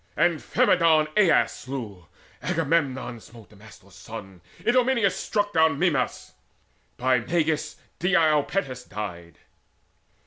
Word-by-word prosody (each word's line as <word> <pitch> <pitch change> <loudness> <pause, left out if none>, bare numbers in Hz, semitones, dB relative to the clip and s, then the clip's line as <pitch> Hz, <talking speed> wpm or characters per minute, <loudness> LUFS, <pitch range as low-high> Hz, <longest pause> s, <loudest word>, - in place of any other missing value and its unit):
Amphimedon 165 -1 +3
Aias 195 -6 +4
slew: 110 -10 -8 0.3
Agamemnon 135 -6 -1
smote 115 -1 -16
Damastor's 105 -2 -17
son: 95 -5 -10 0.2
Idomeneus 245 -4 +2
struck 205 -1 -2
down 160 -2 +3
Mimas: 155 -5 -1 0.6
by 130 0 +2
Meges 160 +4 -1 0.2
Deiopites 155 -6 +1
died. 85 -5 -7
140 Hz, 90 wpm, -25 LUFS, 110-170 Hz, 0.6 s, Aias